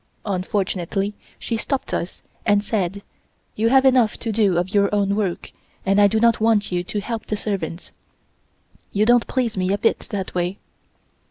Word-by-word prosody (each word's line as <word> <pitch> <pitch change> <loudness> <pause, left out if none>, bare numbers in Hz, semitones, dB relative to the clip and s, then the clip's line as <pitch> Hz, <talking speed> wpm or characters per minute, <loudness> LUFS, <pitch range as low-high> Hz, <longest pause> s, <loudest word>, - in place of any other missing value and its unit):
Unfortunately, 195 0 -1 0.2
she 230 - -3
stopped 270 +4 -3
us, 175 - -4 0.2
and 205 -1 +3
said: 200 -2 -2 0.5
"You 225 +2 +2
have 265 +1 +5
enough 250 -5 +4
to 225 - -2
do 205 -5 +2
of 180 +2 -1
your 200 -1 +4
own 200 -1 +1
work, 200 -5 -2 0.3
and 195 +1 +4
I 205 - +7
do 220 +2 +1
not 230 -1 +3
want 220 -3 +2
you 175 0 0
to 190 +3 -3
help 230 +1 -5
the 210 - -2
servants. 185 -5 -4 1.0
You 210 +1 +2
don't 240 0 +4
please 250 -4 -1
me 185 0 0
a 200 - +2
bit 225 - +1
that 195 -3 -4
way." 180 +2 -1
205 Hz, 175 wpm, -22 LUFS, 190-225 Hz, 1.0 s, I